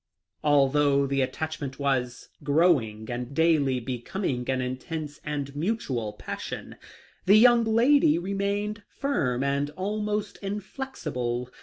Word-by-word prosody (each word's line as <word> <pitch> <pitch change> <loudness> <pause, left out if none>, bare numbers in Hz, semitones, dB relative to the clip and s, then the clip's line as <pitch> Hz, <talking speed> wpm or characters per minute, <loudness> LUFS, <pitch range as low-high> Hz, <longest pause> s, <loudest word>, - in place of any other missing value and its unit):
Although 145 -1 +4
the 135 0 0
attachment 140 0 -3
was 125 -3 -1
growing 140 -8 +2
and 125 +2 -5
daily 150 -5 +3
becoming 125 - -3
an 130 -1 +1
intense 145 +4 -5
and 145 -2 -4
mutual 145 - -2
passion, 105 - -7 0.5
the 200 +3 +8
young 240 +1 +6
lady 230 - +4
remained 200 +3 -2
firm 135 - -1
and 140 +1 0
almost 210 +2 -2
inflexible. 170 - -4
145 Hz, 110 wpm, -27 LUFS, 130-200 Hz, 0.5 s, the